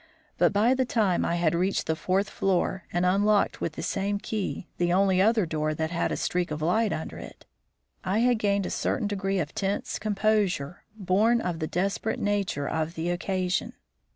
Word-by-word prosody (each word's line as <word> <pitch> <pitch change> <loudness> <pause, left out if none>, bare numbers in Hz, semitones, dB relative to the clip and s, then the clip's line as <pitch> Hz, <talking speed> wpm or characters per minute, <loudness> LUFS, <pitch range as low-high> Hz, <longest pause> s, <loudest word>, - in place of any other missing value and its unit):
But - - +4
by 220 +5 +3
the 260 0 +1
time 215 -7 +1
I 170 - 0
had 170 -2 +1
reached 185 +3 0
the 160 - 0
fourth 190 +4 0
floor, 190 -2 -1
and 175 +1 +1
unlocked, 205 +3 +2
with 165 - -2
the 160 - -6
same 200 +3 -1
key, 200 -3 -4
the 175 0 +2
only 190 0 +3
other 220 -1 +3
door 155 -1 -1
that 160 +1 -2
had 170 - -1
a - - -1
streak 180 0 -1
of 150 0 -4
light 195 +7 +1
under 160 - -5
it, - - -11 0.6
I 190 +3 0
had 245 -2 +3
gained 200 -2 +1
a - - -4
certain 225 - -1
degree 195 -1 -1
of 155 -4 -2
tense 195 0 -2
composure 205 -7 0
born 215 +4 +2
of 175 -6 -3
the 155 - -2
desperate 195 +5 -1
nature 200 -8 -1
of 160 +1 -2
the 165 +2 -1
occasion. 185 0 -1
190 Hz, 190 wpm, -27 LUFS, 175-205 Hz, 0.6 s, But